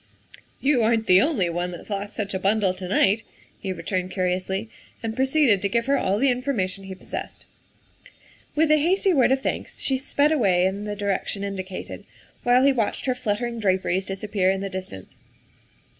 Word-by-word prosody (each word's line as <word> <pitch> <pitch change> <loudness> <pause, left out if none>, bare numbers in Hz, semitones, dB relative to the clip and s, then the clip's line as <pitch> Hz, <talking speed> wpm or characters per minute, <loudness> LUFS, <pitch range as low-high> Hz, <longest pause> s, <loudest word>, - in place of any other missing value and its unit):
" - - -22
You 275 -4 +4
aren't 225 0 +2
the 185 -1 +6
only 260 - +1
one 175 +1 -2
that's 175 +4 -9
lost 200 +1 -4
such 205 -2 -3
a 190 - -1
bundle 195 -1 +2
to 185 0 -7
night," 200 +3 +3 0.4
he 190 - -4
returned 185 +1 -3
curiously, 185 +2 -1 0.4
and 225 -1 -3
proceeded 265 -6 +3
to 200 - 0
give 235 +2 0
her 280 - +2
all 195 -6 +1
the 265 +4 +3
information 220 -7 -2
he 190 0 -7
possessed. - - -7 1.1
With 310 0 +3
a 305 - +6
hasty 375 +4 +2
word 260 -4 +4
of 265 0 +2
thanks - - -3
she 265 -1 0
sped 285 +2 +2
away 190 - +3
in 200 +2 -2
the 210 0 -3
direction 200 0 -2
indicated, 190 -2 -6 0.4
while 245 +1 +4
he 275 0 +5
watched 225 -5 -1
her 255 - +2
fluttering 235 0 -2
draperies 190 -2 0
disappear 195 -1 0
in 190 0 0
the 195 - -3
distance. 185 - -7
205 Hz, 185 wpm, -24 LUFS, 190-250 Hz, 1.1 s, the